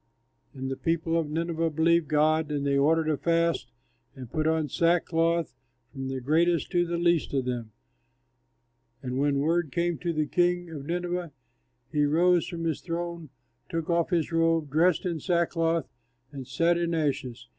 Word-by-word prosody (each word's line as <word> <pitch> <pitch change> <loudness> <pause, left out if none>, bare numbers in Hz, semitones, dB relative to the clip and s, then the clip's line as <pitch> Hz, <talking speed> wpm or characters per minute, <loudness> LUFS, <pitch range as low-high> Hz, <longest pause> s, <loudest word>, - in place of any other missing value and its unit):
And 135 0 -4
the 135 - -3
people 165 0 -1
of 165 -3 0
Nineveh 165 +1 -1
believed 165 +1 +2
God; 155 +1 +2
and 145 -1 -2
they 140 0 +1
ordered 155 +3 +3
a 155 -2 +1
fast 165 -5 0 0.4
and 130 -4 -10
put 155 0 0
on 160 -1 +1
sackcloth, 165 0 +1 0.4
from 135 -2 -6
the 135 0 -3
greatest 165 +6 +1
to 175 -2 +2
the 170 0 -2
least 170 -4 +1
of 130 -2 0
them. 120 -3 -4 1.3
And 130 0 -3
when 140 0 +2
word 165 0 +1
came 170 +1 -1
to 175 - -2
the 155 -2 0
king 175 +2 0
of 145 -3 -7
Nineveh, 175 -1 -2 0.6
he 150 -1 +2
rose 175 +3 +3
from 170 -1 -5
his 160 -3 -1
throne, 170 -2 -5 0.4
took 165 0 -2
off 170 -1 +1
his 170 -3 0
robe, 165 -3 +1
dressed 165 +4 +3
in 170 -3 -2
sackcloth, 165 -1 0 0.4
and 135 -3 -8
sat 170 +6 +2
in 170 -1 0
ashes. 135 -6 -2
165 Hz, 165 wpm, -27 LUFS, 145-170 Hz, 1.3 s, ordered